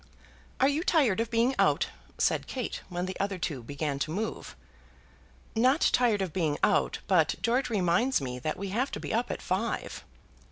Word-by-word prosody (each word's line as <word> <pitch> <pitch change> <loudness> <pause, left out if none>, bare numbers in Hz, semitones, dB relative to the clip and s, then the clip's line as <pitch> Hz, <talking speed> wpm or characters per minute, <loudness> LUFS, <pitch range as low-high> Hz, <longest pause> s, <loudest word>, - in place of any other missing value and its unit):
"Are 265 - +5
you 290 +4 0
tired 270 - +3
of 230 0 0
being 235 +3 +2
out?" - - +3 0.3
said - - +1
Kate, 255 -3 -4
when 175 0 -2
the 185 0 -5
other 195 -1 -1
two 150 -6 -3
began 140 +3 -3
to 155 - -1
move. 210 +7 -4 1.0
"Not 255 +7 +4
tired 230 -5 +3
of 180 - -5
being 160 -6 0
out, - - +3
but - - +3
George 250 +2 +1
reminds 205 +5 +2
me 125 -2 -5
that 155 +4 -3
we 200 +1 -4
have 245 +8 0
to - - -3
be - - -4
up 235 +2 0
at - - -4
five." 195 +6 -2
205 Hz, 185 wpm, -29 LUFS, 170-245 Hz, 1.0 s, Are